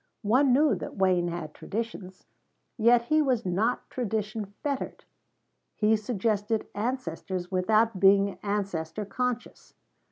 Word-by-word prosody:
One 255 +6 +4
knew 290 +3 +4
that - - -6
Wayne 185 -2 +2
had 170 -3 -5
traditions, 205 -4 -6 0.5
yet 235 +1 +4
he 310 +6 +3
was 255 -6 +1
not 200 +7 0
tradition 215 -2 -2 0.2
fettered; 280 -2 -3 0.7
he 215 +1 +3
suggested 215 0 -1
ancestors 190 -5 -3
without 215 +3 +2
being 200 0 +4
ancestor 200 -2 -2
conscious. 245 +4 -4
210 Hz, 115 wpm, -27 LUFS, 190-235 Hz, 0.7 s, One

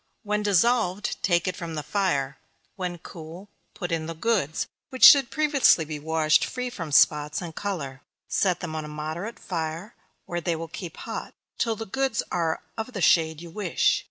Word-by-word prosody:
When 210 0 0
dissolved, 205 -1 +1
take 175 -1 +2
it 185 - -1
from 170 -3 -6
the 150 - -3
fire; 150 -9 -1 0.4
when 180 -2 -4
cool, 170 +3 -10 0.3
put 175 -2 -4
in 160 -1 -1
the 165 - -5
goods, 175 -5 0 0.2
which 260 - -4
should 275 -4 +9
previously 290 - +4
be 150 -1 -5
washed 155 0 +2
free 250 -1 -3
from 165 -9 -6
spots, 150 +1 +4
and 170 -3 -6
color; 155 -10 -4 0.3
set 180 -3 +1
them 160 -3 -4
on 155 - -3
a - - -7
moderate 155 +8 -5
fire, 165 +4 -4 0.3
where 175 0 -3
they 170 0 0
will 165 +1 -5
keep 170 +1 -8
hot, - - -6 0.2
till 230 -2 +1
the 225 - -6
goods 265 +6 -1
are 165 -2 -1 0.2
of 220 +3 -4
the 200 - -4
shade 160 -1 +3
you 170 - -10
wish. 190 -2 +1
175 Hz, 185 wpm, -26 LUFS, 160-205 Hz, 0.4 s, should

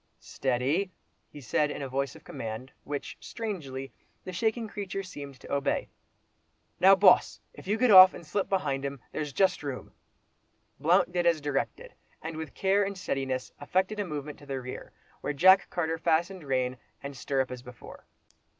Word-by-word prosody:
"Steady," 135 +9 -1 0.4
he 150 - -11
said 145 +4 0
in 145 - -5
a - - -3
voice 135 0 -2
of - - -14
command, 115 +4 -6
which, 145 -1 -5
strangely, 140 - -6 0.3
the 185 - -7
shaking 225 +4 0
creature 195 -2 -5
seemed 140 -7 -9
to - - -8
obey. 140 0 0 0.9
"Now, 195 +1 +8
Boss! 190 -1 +5 0.2
you 205 +3 0
get 250 0 +4
off, 185 -1 +10
and 170 - -10
slip 200 +5 -2
behind 145 -8 0
him—there's 140 +2 -5
just 190 +5 +2
room." 140 -3 -6 0.9
Blount 175 +5 +3
did 175 -1 +1
as 165 -2 +3
directed, 145 -2 -3 0.3
and 160 0 -6
with 160 -2 -7
care 195 +1 +2
and 200 0 -4
steadiness, 135 -7 -3
effected 185 +7 0
a - - +1
movement 150 -4 -6
to 145 - -15
the 135 -1 -3
rear, 125 0 -8 0.3
while - - -2
Jack 185 +6 +6
Carter 165 -2 -2
fastened 170 +2 0
rein 130 -2 0 0.3
and 140 0 -6
stirrup 135 0 -1
as 125 -1 -6
before. 125 -2 -13
150 Hz, 165 wpm, -28 LUFS, 135-185 Hz, 0.9 s, off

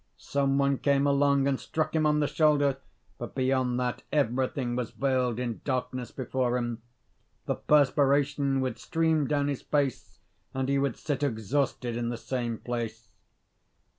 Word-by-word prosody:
Some 140 -1 0
one 140 -1 +2
came 140 -1 +2
along 140 -1 +3
and 135 -2 0
struck 155 0 -2
him 155 -1 +3
on 150 0 +2
the 145 - +2
shoulder; 145 -3 +3 0.4
but - - -7
beyond 130 -1 +1
that 125 -1 -2
everything 130 -2 0
was 125 -2 -2
veiled 130 -4 0
in 120 -3 -3
darkness 130 -2 -2
before 125 -1 -1
him. 120 -2 -3 0.6
The - - 0
perspiration 140 -1 +2
would 125 -3 -2
stream 160 +1 +1
down 145 -1 +1
his 140 -2 -2
face, 140 -4 -1 0.4
and 130 0 -1
he 140 0 +2
would 140 -3 0
sit 145 -3 -3
exhausted 125 -1 -1
in 120 0 -2
the 120 - -3
same 120 -2 -3
place. 115 -3 -5
135 Hz, 155 wpm, -28 LUFS, 125-140 Hz, 0.6 s, along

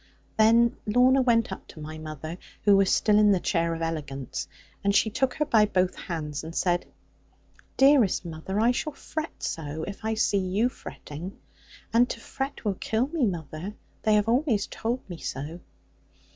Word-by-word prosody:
Then 230 +2 +4
Lorna 250 +5 +5
went 230 -4 +2
up 190 - -7
to - - -12
my 155 +1 -7
mother, 155 +2 -7 0.2
who 205 -1 +6
was 195 -1 +4
still 210 -1 +4
in 210 -1 +6
the 190 - +3
chair 170 -2 0
of 165 - -4
elegance; 145 -5 -4 0.4
and 200 0 +2
she 220 - +3
took 260 +3 0
her 300 - 0
by 215 -5 +4
both 185 -2 +1
hands, 155 -4 -5
and 165 +1 -8
said, 175 -1 +1 0.9
'Dearest 270 -10 +5
mother, 170 +5 -4
I 230 +3 +4
shall 300 +4 -2
fret 315 +2 -6
so, 155 0 -3
if 200 +2 -7
I 220 0 0
see 205 -2 +2
you 195 +6 +1
fretting. 175 - -9 0.6
And 240 +2 +5
to - - -4
fret 270 +2 -5
will 205 - +2
kill 230 +5 0
me, 300 -7 +1
mother. 170 +2 -5 0.3
They 215 -1 +3
have 210 0 +2
always 235 -3 +2
told 240 +3 -3
me 175 -3 -8
so.' 150 +6 -5
200 Hz, 175 wpm, -27 LUFS, 165-230 Hz, 0.9 s, who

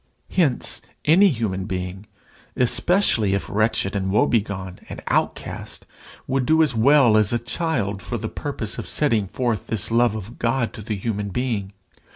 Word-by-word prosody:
Hence, 150 -9 +1 0.2
any 180 +7 +6
human 110 - -1
being, 95 +1 -5 0.5
especially 125 - +2
if 100 - -3
wretched 105 -2 0
and 95 -1 -1
woe 105 - +4
begone 100 -5 -2
and - - -6
outcast, - - -2 0.4
would 130 -1 -1
do 160 0 +5
as 145 -4 +1
well 125 0 +5
as 105 -2 +3
a 120 - +2
child 120 - -2
for - - -4
the - - -4
purpose - - -5
of - - -6
setting 105 -4 +1
forth 120 +2 -2
this 110 -1 -2
love 120 -1 +3
of 110 +3 -8
God 115 0 0
to 110 - -8
the 105 +1 -3
human 105 0 -3
being. 105 -3 -2
110 Hz, 165 wpm, -22 LUFS, 100-125 Hz, 0.5 s, any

